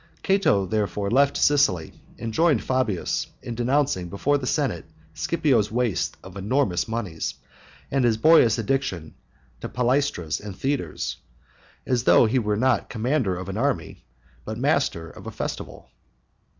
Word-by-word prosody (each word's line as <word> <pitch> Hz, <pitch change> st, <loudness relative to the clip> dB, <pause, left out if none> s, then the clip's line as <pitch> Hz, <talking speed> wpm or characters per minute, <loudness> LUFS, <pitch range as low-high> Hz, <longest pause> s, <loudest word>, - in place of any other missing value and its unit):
Cato 190 Hz, -, +3 dB
therefore 105 Hz, -1 st, -1 dB
left 140 Hz, +3 st, +3 dB
Sicily, 105 Hz, -, +2 dB, 0.2 s
and 115 Hz, -1 st, -5 dB
joined 160 Hz, -4 st, +3 dB
Fabius 130 Hz, -8 st, -1 dB, 0.2 s
in 120 Hz, -, -5 dB
denouncing 120 Hz, -6 st, 0 dB
before 145 Hz, +10 st, +1 dB
the 130 Hz, -, -5 dB
Senate 125 Hz, -, -1 dB, 0.3 s
Scipio's 130 Hz, -11 st, +1 dB
waste 120 Hz, -4 st, -1 dB
of 95 Hz, 0 st, -11 dB
enormous 100 Hz, -1 st, 0 dB
moneys, 105 Hz, -8 st, -3 dB, 0.6 s
and 135 Hz, -1 st, +2 dB
his 115 Hz, -2 st, +3 dB
boyish 140 Hz, -4 st, +5 dB
addiction 105 Hz, -, -2 dB, 0.5 s
to -, -, -6 dB
palaestras 125 Hz, -, 0 dB
and 100 Hz, -2 st, -8 dB
theatres, 135 Hz, -, -2 dB, 0.7 s
as 125 Hz, -1 st, 0 dB
though -, -, +6 dB
he 120 Hz, +4 st, +2 dB
were 105 Hz, -2 st, 0 dB
not 125 Hz, -2 st, +1 dB
commander 120 Hz, -4 st, 0 dB
of 95 Hz, 0 st, -6 dB
an 95 Hz, +1 st, -4 dB
army, 110 Hz, -7 st, -2 dB, 0.4 s
but 110 Hz, 0 st, -5 dB
master 130 Hz, -, 0 dB
of -, -, -12 dB
a -, -, -4 dB
festival. -, -, -6 dB
115 Hz, 140 wpm, -24 LUFS, 100-135 Hz, 0.7 s, though